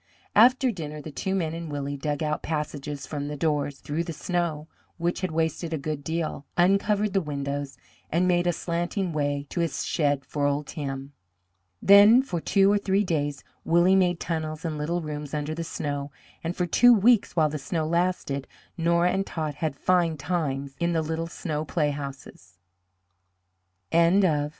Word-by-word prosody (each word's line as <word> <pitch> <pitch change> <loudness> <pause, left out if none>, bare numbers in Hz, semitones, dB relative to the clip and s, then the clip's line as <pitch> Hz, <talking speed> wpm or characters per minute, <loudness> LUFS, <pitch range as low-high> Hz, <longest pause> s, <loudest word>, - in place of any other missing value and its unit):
After 255 +3 +6
dinner 155 -6 -6
the 155 +1 -8
two 190 +7 -2
men 165 -4 -1
and 165 -2 -6
Willie 145 0 -3
dug 145 +2 -2
out 150 0 -1
passages 150 -2 -4
from 145 -2 -4
the 150 0 -5
doors, 145 -2 0
through 150 +4 -3
the 170 - -5
snow, 165 -2 -2 0.3
which 175 +1 -1
had 185 - -1
wasted 160 +1 -1
a - - 0
good 145 0 -4
deal, 160 -2 -3
uncovered 200 +3 +2
the 195 - +2
windows, 140 -2 -4 0.3
and 175 +3 +2
made 175 -1 +2
a - - +4
slanting 175 +2 -2
way 145 -1 -1
to - - -3
his 165 -3 -1
shed 145 -4 0
for 145 -1 -1
old 145 +1 -1
Tim. 135 -1 -5 0.7
Then 205 +6 +8
for 175 -11 -3
two 195 +3 +4
or 205 - +3
three 200 0 +1
days 145 -6 -2 0.2
Willie 175 +3 +4
made 180 -2 +2
tunnels 160 -1 -3
and 160 -2 -2
little 165 +4 -2
rooms 150 -1 -5
under 150 +1 -2
the 165 +1 -4
snow, 145 -3 -4 0.3
and 165 +2 -2
for 180 - 0
two 245 +8 +6
weeks, 225 +1 +3
while 155 -3 +3
the 150 0 -4
snow 155 +3 -2
lasted, 170 -5 -1 0.3
Nora 170 +1 +2
and 195 - 0
Tot 155 -5 -4
had 150 0 -3
fine 170 0 +2
times 140 -3 -2
in 170 0 +1
the 160 -1 +1
little 160 +1 -3
snow 155 -3 -4
playhouses. 140 - -4 1.3
XXX. 170 +4 +4
MR. 150 -5 +2
160 Hz, 175 wpm, -26 LUFS, 145-175 Hz, 1.3 s, Then